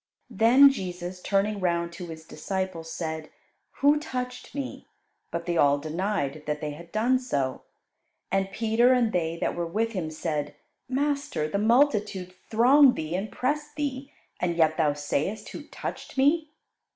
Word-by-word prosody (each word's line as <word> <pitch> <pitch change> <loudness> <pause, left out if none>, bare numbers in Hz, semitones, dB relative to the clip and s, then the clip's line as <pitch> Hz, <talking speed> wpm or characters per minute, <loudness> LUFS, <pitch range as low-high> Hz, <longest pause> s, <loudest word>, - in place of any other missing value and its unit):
Then 240 +6 +7
Jesus, 180 -5 -5
turning 200 +2 +1
round 170 -2 0
to 175 0 -7
His 160 -1 -9
disciples, 185 -3 -4
said, 160 -1 -4 0.5
"Who 290 +2 +5
touched 250 -4 -5
Me?" 275 -2 -5 0.4
But 170 0 -4
they 175 -1 -1
all 145 -1 +5
denied 155 -1 -2
that 150 0 -1
they 150 -1 -3
had 170 +3 -11
done 240 +4 +2
so, 140 - -2 0.7
and 195 0 0
Peter 230 +4 +3
and 240 -3 +2
they 165 -1 0
that - - -1
were 170 -1 -3
with 225 +6 -1
him 180 -7 -3
said, 155 -2 -3 0.3
"Master, 280 - -1
the 200 +6 -1
multitude 210 -6 +2 0.2
throng 255 +4 +6
Thee 155 +1 -4
and 195 +4 -3
press 295 +3 -1
Thee, 280 -2 -3 0.3
and 175 -1 0
yet 155 -1 +4
Thou 155 -3 +2
sayest, 150 +9 -2
Who 290 - -8
touched 300 - -7
Me!" 300 +4 +3
195 Hz, 155 wpm, -27 LUFS, 165-250 Hz, 0.7 s, Then